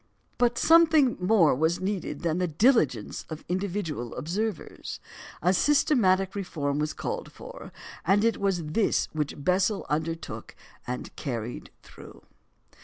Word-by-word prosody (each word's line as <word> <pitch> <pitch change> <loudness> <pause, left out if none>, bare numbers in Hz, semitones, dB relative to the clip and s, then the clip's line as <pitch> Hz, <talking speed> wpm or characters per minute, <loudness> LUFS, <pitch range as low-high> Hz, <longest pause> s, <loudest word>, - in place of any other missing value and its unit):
But 240 -1 +2
something 320 -5 +5
more 180 -4 +4
was 160 +6 +1
needed 185 -6 -3
than 170 +1 0
the 180 - +1
diligence 225 - +2
of 155 -1 -7
individual 180 - -3
observers. 200 +4 -4 0.4
A 180 +2 +4
systematic 195 -8 +3
reform 150 -8 -2
was 150 0 0
called - - -4
for; - - -10 0.3
and 205 +4 +3
it 230 - +2
was 195 -4 0
this 195 +8 +1
which 150 -2 -2
Bessel 190 +4 +1
undertook 160 +2 -4 0.3
and 125 0 -5
carried 120 -4 -5
through. - - -14
185 Hz, 125 wpm, -27 LUFS, 155-210 Hz, 0.4 s, something